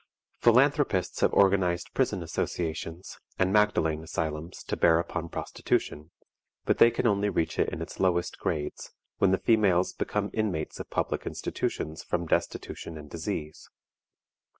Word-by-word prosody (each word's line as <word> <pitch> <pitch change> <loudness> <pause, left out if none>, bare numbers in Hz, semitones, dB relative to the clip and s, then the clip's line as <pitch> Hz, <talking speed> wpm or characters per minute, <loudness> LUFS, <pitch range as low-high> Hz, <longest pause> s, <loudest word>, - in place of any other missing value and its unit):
Philanthropists 125 - +3
have - - +3
organized 95 -3 +2
Prison 105 -9 0
Associations 80 +1 -4 0.2
and 95 0 +2
Magdalen 95 -7 +2
Asylums 80 +1 -4
to - - -3
bear 80 -1 +5
upon 85 0 -3
prostitution, 75 0 -2 0.6
but - - +1
they 115 - +8
can 120 - -2
only 105 -2 +2
reach 85 -4 -1
it - - +3
in - - -4
its - - -10
lowest 90 -1 +1
grades, 75 -4 -3 0.3
when 100 - +4
the 95 - +3
females 100 -6 +3
become 105 -1 -2
inmates 100 -8 -2
of - - -7
public - - -2
institutions 80 +1 -3
from 85 -1 -2
destitution 80 0 -2
and 75 -1 -11
disease. 80 -3 -5
90 Hz, 140 wpm, -28 LUFS, 80-100 Hz, 0.6 s, they